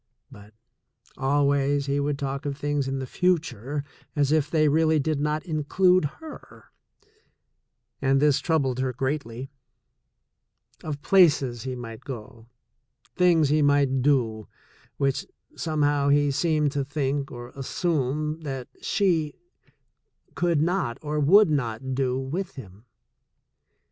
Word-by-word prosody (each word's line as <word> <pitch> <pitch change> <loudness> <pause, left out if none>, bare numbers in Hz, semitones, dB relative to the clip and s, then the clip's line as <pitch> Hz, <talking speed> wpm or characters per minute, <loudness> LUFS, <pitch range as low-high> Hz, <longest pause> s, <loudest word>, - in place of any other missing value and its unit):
But 105 +1 -15 0.6
always 140 0 +1
he 140 0 0
would 145 0 -1
talk 140 0 -4
of 140 -1 -3
things 145 -1 -1
in 135 0 -2
the 135 - -3
future 145 - -1 0.3
as 145 -1 +2
if 155 -2 +2
they 155 -1 +3
really 160 +1 +3
did 150 0 0
not 150 +2 -1
include 180 +2 +2
her 310 - -10 0.7
— - - -52
and 135 0 +3
this 145 0 +3
troubled 140 -5 0
her 130 -1 -1
greatly 130 -1 -4 0.7
— - - -35
of 145 -2 -5
places 145 -11 +4
he 130 -1 -3
might 115 -2 -8
go, 115 -3 -9 0.7
things 170 -5 +4
he 150 +1 +3
might 140 -2 +3
do, 120 -6 +1 0.5
which, 135 -2 0 0.3
somehow, 145 -3 +1
he 145 0 +3
seemed 150 0 +1
to 140 -1 -1
think 140 -1 -2
or 120 0 -8
assume 150 +1 -2
that 135 -4 -5
she 165 -7 +1 1.0
could 170 -3 +1
not 175 -9 -1
or 150 0 -2
would 180 +5 +6
not 130 -2 -2
do 130 -1 0
with 165 +8 -4
him. 105 -4 -12
145 Hz, 130 wpm, -25 LUFS, 130-155 Hz, 1.0 s, would